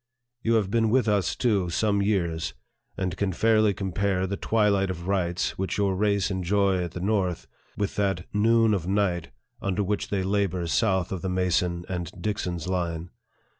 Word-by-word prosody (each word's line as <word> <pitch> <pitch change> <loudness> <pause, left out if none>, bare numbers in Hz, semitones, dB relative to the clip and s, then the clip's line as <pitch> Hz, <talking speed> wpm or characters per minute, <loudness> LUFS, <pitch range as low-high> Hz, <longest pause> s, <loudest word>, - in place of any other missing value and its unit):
You 115 0 +2
have 100 -4 +1
been 115 -1 +2
with 125 0 +3
us, 100 -4 +1
too, 100 -8 +1
some 100 +3 +1
years, 85 -8 0 0.4
and 95 -2 -2
can 100 0 -1
fairly 110 +2 +3
compare 95 0 -1
the 100 +1 -2
twilight 100 -2 +2
of 85 -1 -5
rights, 90 -3 -1
which 95 - -2
your 100 -2 +1
race 100 0 +1
enjoy 95 0 +1
at 85 - -6
the - - -5
North, 95 -3 0 0.3
with 100 -1 -2
that 95 -4 0
" - - -38 0.2
noon 115 -2 +4
of 90 -4 -1
night 95 -4 0 0.2
" - - -35
under 100 +1 0
which 105 +1 -2
they 100 -2 0
labor 95 -2 0
south 95 0 +1
of 95 -3 -4
Mason 90 -1 0
and 90 -2 -4
Dixon's 90 -6 -3
line. 85 -2 -2
95 Hz, 175 wpm, -26 LUFS, 90-105 Hz, 0.4 s, noon